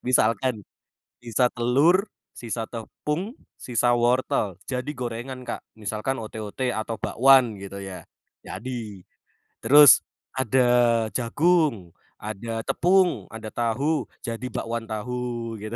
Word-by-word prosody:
Misalkan 115 Hz, -2 st, +1 dB, 0.6 s
sisa 120 Hz, +1 st, +2 dB
telur, 140 Hz, -, +3 dB, 0.3 s
sisa 115 Hz, -1 st, -4 dB
tepung, 150 Hz, -, -4 dB, 0.2 s
sisa 120 Hz, 0 st, +1 dB
wortel, 120 Hz, -6 st, +1 dB
jadi 130 Hz, +2 st, -3 dB
gorengan 125 Hz, +1 st, -5 dB
Kak, -, -, -5 dB, 0.2 s
misalkan 110 Hz, +6 st, -3 dB
ote-ote 110 Hz, +3 st, -4 dB
atau 110 Hz, +1 st, -3 dB
bakwan 130 Hz, -3 st, +4 dB
gitu 100 Hz, 0 st, -8 dB
ya, 95 Hz, -1 st, -8 dB, 0.4 s
jadi. 110 Hz, -3 st, -6 dB, 0.6 s
Terus 145 Hz, +4 st, +8 dB, 0.3 s
ada 130 Hz, 0 st, +1 dB, 0.5 s
jagung, 130 Hz, -, +1 dB, 0.3 s
ada 115 Hz, +2 st, -5 dB
tepung, 175 Hz, -, +2 dB
ada 110 Hz, -1 st, -7 dB
tahu, 130 Hz, +7 st, 0 dB, 0.2 s
jadi 115 Hz, +2 st, -5 dB
bakwan 115 Hz, 0 st, -3 dB
tahu 115 Hz, +1 st, -4 dB
gitu. 110 Hz, +2 st, -6 dB
120 Hz, 105 wpm, -25 LUFS, 110-130 Hz, 0.6 s, Terus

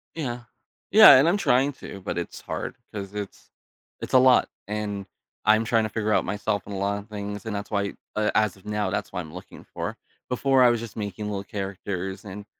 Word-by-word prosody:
Yeah. 125 Hz, -7 st, -3 dB, 0.5 s
Yeah, -, -, +10 dB
and 135 Hz, +5 st, +5 dB
I'm 185 Hz, +4 st, +3 dB
trying 140 Hz, -6 st, +2 dB
to, 100 Hz, -, -10 dB
but 90 Hz, -, -4 dB
it's 85 Hz, -, -5 dB
hard, -, -, -5 dB, 0.2 s
'cause 100 Hz, -1 st, -6 dB
it's 105 Hz, -1 st, -7 dB, 0.5 s
it's -, -, -7 dB
a 130 Hz, -, +8 dB
lot, 130 Hz, 0 st, +5 dB, 0.2 s
and 105 Hz, -1 st, -3 dB, 0.4 s
I'm 110 Hz, +2 st, +4 dB
trying 115 Hz, 0 st, +2 dB
to 110 Hz, -, -2 dB
figure 110 Hz, -1 st, -1 dB
out -, -, +3 dB
myself 105 Hz, 0 st, -2 dB
in 100 Hz, -, -6 dB
a -, -, -4 dB
lotta 100 Hz, +1 st, -2 dB
things, 105 Hz, -1 st, -6 dB
and 110 Hz, -2 st, -3 dB
that's 100 Hz, 0 st, -5 dB
why 100 Hz, -1 st, -1 dB, 0.2 s
uh, 105 Hz, 0 st, +1 dB
as 105 Hz, -3 st, +2 dB
of 95 Hz, -, -21 dB
now, 105 Hz, -2 st, -1 dB
that's 100 Hz, -, -3 dB
what 90 Hz, -, -3 dB
I'm 80 Hz, -2 st, -10 dB
looking 90 Hz, +1 st, -11 dB
for. -, -, -4 dB, 0.3 s
Before, 130 Hz, +1 st, +3 dB
I 125 Hz, -, +7 dB
was 120 Hz, -1 st, +1 dB
just 115 Hz, 0 st, -8 dB
making 105 Hz, -1 st, -4 dB
little 100 Hz, -1 st, -3 dB
characters, 95 Hz, -1 st, -5 dB
and 100 Hz, +1 st, -8 dB
105 Hz, 215 wpm, -25 LUFS, 100-110 Hz, 0.5 s, Yeah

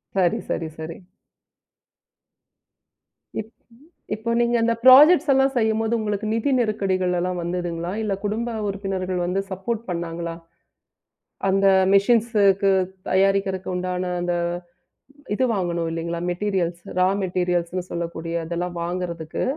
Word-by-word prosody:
சரி, 180 Hz, -3 st, +2 dB
சரி, 165 Hz, -, -2 dB
சரி. 160 Hz, +1 st, -6 dB, 2.4 s
இப் 220 Hz, 0 st, -6 dB, 0.7 s
இப்ப 230 Hz, +2 st, -3 dB
நீங்க 240 Hz, 0 st, +2 dB
அந்த 230 Hz, 0 st, +3 dB
ப்ரொஜெக்ட்ஸ் 295 Hz, +5 st, +8 dB
எல்லாம் 270 Hz, 0 st, +3 dB
செய்யும்போது 220 Hz, 0 st, +1 dB
உங்களுக்கு 210 Hz, 0 st, -2 dB
நிதி 230 Hz, +5 st, 0 dB
நெருக்கடிகள் 190 Hz, -5 st, 0 dB
எல்லாம் 180 Hz, 0 st, -2 dB
வந்ததுங்களா? 175 Hz, 0 st, -3 dB
இல்ல 205 Hz, -2 st, -1 dB
குடும்ப 225 Hz, +3 st, -2 dB
உறுப்பினர்கள் 190 Hz, -2 st, -3 dB
வந்து 185 Hz, +2 st, 0 dB
சப்போர்ட் 210 Hz, +4 st, -3 dB
பண்ணாங்களா? 170 Hz, -1 st, -4 dB, 1.2 s
அந்த 195 Hz, +1 st, +3 dB, 0.3 s
மெஷின்ஸுக்கு 200 Hz, -2 st, +4 dB, 0.4 s
தயாரிக்கருக்கு 195 Hz, 0 st, +1 dB
உண்டான 180 Hz, 0 st, -2 dB
அந்த 175 Hz, 0 st, 0 dB, 1.0 s
இது 260 Hz, -, 0 dB
வாங்கணும். 170 Hz, -3 st, -1 dB
இல்லீங்களா? 170 Hz, +1 st, -3 dB
மெட்டீரியல்ஸ், 175 Hz, -2 st, -1 dB, 0.2 s
ராமெட்டீரியல்ஸ்ன்னு 180 Hz, -2 st, 0 dB
சொல்லக்கூடிய 170 Hz, 0 st, -4 dB
அதெல்லாம் 175 Hz, +1 st, -3 dB
வாங்குறதுக்கு, 170 Hz, -2 st, -4 dB
185 Hz, 105 wpm, -23 LUFS, 175-210 Hz, 2.4 s, ப்ரொஜெக்ட்ஸ்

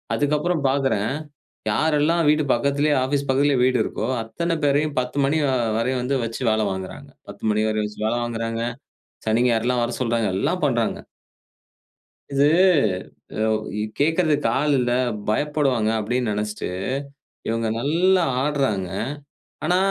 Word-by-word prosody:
அதுக்கப்புறம் 150 Hz, +3 st, 0 dB
பார்க்கறேன், 130 Hz, -6 st, +1 dB, 0.6 s
யாரெல்லாம் 155 Hz, +5 st, +2 dB
வீட்டு 150 Hz, 0 st, +3 dB
பக்கத்திலயே 140 Hz, +4 st, +1 dB
ஆபீஸ் 140 Hz, +1 st, -1 dB
பக்கத்திலயே 135 Hz, +1 st, +3 dB
வீடு 130 Hz, -1 st, +3 dB
இருக்கோ! 110 Hz, -, -3 dB, 0.2 s
அத்தன 165 Hz, +9 st, -2 dB
பேரையும் 145 Hz, +1 st, +1 dB
10:00 125 Hz, +2 st, -5 dB
மணி 145 Hz, +3 st, +2 dB
வ 140 Hz, -, +2 dB, 0.3 s
வரையும் 125 Hz, +2 st, 0 dB
வந்து 135 Hz, +2 st, 0 dB
வச்சு 115 Hz, +2 st, -5 dB
வேலை 110 Hz, 0 st, +2 dB
வாங்குகிறாங்க. 95 Hz, -1 st, -6 dB, 0.2 s
10:00 -, -, -11 dB
மணி 105 Hz, +1 st, +1 dB
வரையும் 110 Hz, -1 st, 0 dB
வச்சு 105 Hz, -, -12 dB
வேல 115 Hz, -, 0 dB
வாங்குகிறாங்க. 115 Hz, -1 st, -3 dB, 0.6 s
சனி, 110 Hz, +2 st, +2 dB
ஞாயிறுலாம் 120 Hz, +1 st, +1 dB
வர 120 Hz, -, -3 dB
சொல்றாங்க. 115 Hz, -3 st, +1 dB
எல்லாம் 165 Hz, -, -1 dB
பண்றாங்க. 120 Hz, -5 st, 0 dB, 1.3 s
இது 140 Hz, +1 st, +3 dB, 1.0 s
அவு 110 Hz, -, +2 dB, 0.2 s
கு 105 Hz, -, -1 dB, 0.2 s
கேட்கிறதுக்கு 155 Hz, -2 st, +2 dB
ஆள் 150 Hz, 0 st, +2 dB
இல்ல 120 Hz, -1 st, 0 dB, 0.4 s
பயப்படுவாங்க 135 Hz, -3 st, +1 dB
அப்பிடின்னு 115 Hz, +2 st, -1 dB
நெனைச்சுட்டு, 105 Hz, +1 st, -3 dB, 0.8 s
இவுங்க 115 Hz, 0 st, 0 dB
நல்லா 175 Hz, +7 st, +3 dB, 0.2 s
ஆட்றாங்க. 135 Hz, -11 st, 0 dB, 0.8 s
ஆனா 180 Hz, -, +3 dB
130 Hz, 135 wpm, -23 LUFS, 115-150 Hz, 1.3 s, வீட்டு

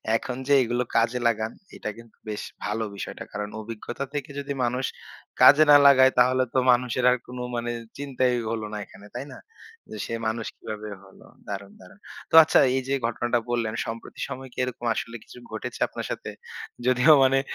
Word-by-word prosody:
এখন 125 Hz, +2 st, -2 dB
যে 145 Hz, -, +4 dB
এগুলো 120 Hz, +1 st, -1 dB
কাজে 115 Hz, +2 st, +2 dB
লাগান, 110 Hz, -1 st, 0 dB, 0.2 s
এটা -, -, -5 dB
কিন্তু 115 Hz, -1 st, -15 dB
বেশ 105 Hz, -1 st, -4 dB, 0.2 s
ভালো 105 Hz, +2 st, -1 dB
বিষয়টা। -, -, -6 dB
কারণ 105 Hz, 0 st, -4 dB
অভিজ্ঞতা 115 Hz, +4 st, -6 dB
থেকে 145 Hz, -2 st, -4 dB
যদি 140 Hz, 0 st, -4 dB
মানুষ 125 Hz, +2 st, 0 dB, 0.6 s
কাজে 150 Hz, +2 st, +9 dB
না -, -, +10 dB
লাগায়, 130 Hz, -1 st, +7 dB
তাহলে 130 Hz, +1 st, +4 dB
তো -, -, 0 dB
মানুষের 125 Hz, 0 st, +1 dB
আর 125 Hz, -, +2 dB
কোন 125 Hz, -, -9 dB, 0.2 s
মানে 120 Hz, 0 st, -2 dB, 0.3 s
চিন্তাই 130 Hz, -3 st, 0 dB, 0.2 s
হল 115 Hz, -1 st, -2 dB
না -, -, -3 dB
এখানে। 100 Hz, -, -16 dB
তাই 125 Hz, -, -4 dB
না? -, -, -11 dB, 0.5 s
যে 110 Hz, -, -6 dB
সে -, -, -6 dB
মানুষ 110 Hz, 0 st, -2 dB
কিভাবে 105 Hz, 0 st, -7 dB
হলো? 95 Hz, -1 st, -17 dB, 0.2 s
দারুণ, 100 Hz, -1 st, -6 dB
দারুণ। -, -, -16 dB, 0.3 s
তো -, -, +2 dB
আচ্ছা 155 Hz, -, +4 dB, 0.2 s
এইযে 130 Hz, +1 st, -2 dB
ঘটনাটা 120 Hz, +1 st, 0 dB
বললেন, 115 Hz, -2 st, -1 dB
সম্প্রতি 115 Hz, +1 st, -8 dB
সময় 130 Hz, 0 st, -7 dB
কি -, -, -24 dB
এরকম 125 Hz, -1 st, -5 dB
আসলে 115 Hz, -, -4 dB
কিছু -, -, -15 dB
ঘটেছে 115 Hz, +3 st, -6 dB
আপনার -, -, -6 dB
সাথে? -, -, -5 dB, 0.6 s
যদিও 130 Hz, +5 st, +6 dB
মানে 135 Hz, 0 st, +4 dB
120 Hz, 180 wpm, -25 LUFS, 110-130 Hz, 0.6 s, না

